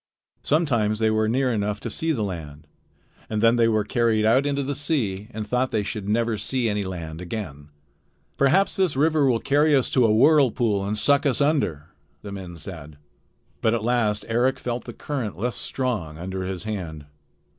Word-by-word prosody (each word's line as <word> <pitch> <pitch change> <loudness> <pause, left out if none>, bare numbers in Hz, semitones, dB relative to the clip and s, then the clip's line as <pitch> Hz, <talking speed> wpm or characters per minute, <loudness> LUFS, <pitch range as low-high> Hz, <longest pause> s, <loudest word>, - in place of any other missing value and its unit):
Sometimes 120 -9 +1
they 110 0 +2
were 110 0 +1
near 130 +1 +1
enough 105 -1 -1
to - - -4
see 165 0 -1
the 120 -9 -1
land, 80 -6 -6 0.6
then 115 +2 +3
they 115 -1 +4
were 110 -2 +2
carried 110 -1 +1
out 130 +6 +4
into 140 -1 0
the 140 +2 -2
sea 120 -9 -2
and 110 -3 -5
thought 125 +4 0
that - - -1
they 105 - 0
should 100 -1 -5
never 115 0 +1
see 120 +4 -1
any 105 -1 0
land 85 -3 -6
again. 85 -6 -6 0.7
"Perhaps 150 +9 +2
this 185 -7 +1
river 150 0 +3
will 120 -2 +2
carry 145 +3 +3
us 130 - +1
to 130 - +3
a - - +3
whirlpool 120 -5 +3
and 105 +2 -2
suck 140 +7 +3
us 130 - +1
under," 105 - 0 0.3
the 100 - -7
men 95 -3 -8
said. 80 -4 -8 0.6
But 110 +1 +2
at 115 - -3
last 110 -3 +1
Eric 120 +3 +1
felt 120 -1 -4
the 120 - -7
current 125 -10 -4
less 120 +5 -2
strong 105 - -3
under 95 +2 -4
his 95 0 -4
hand. 85 -9 -5
110 Hz, 190 wpm, -24 LUFS, 100-130 Hz, 0.7 s, they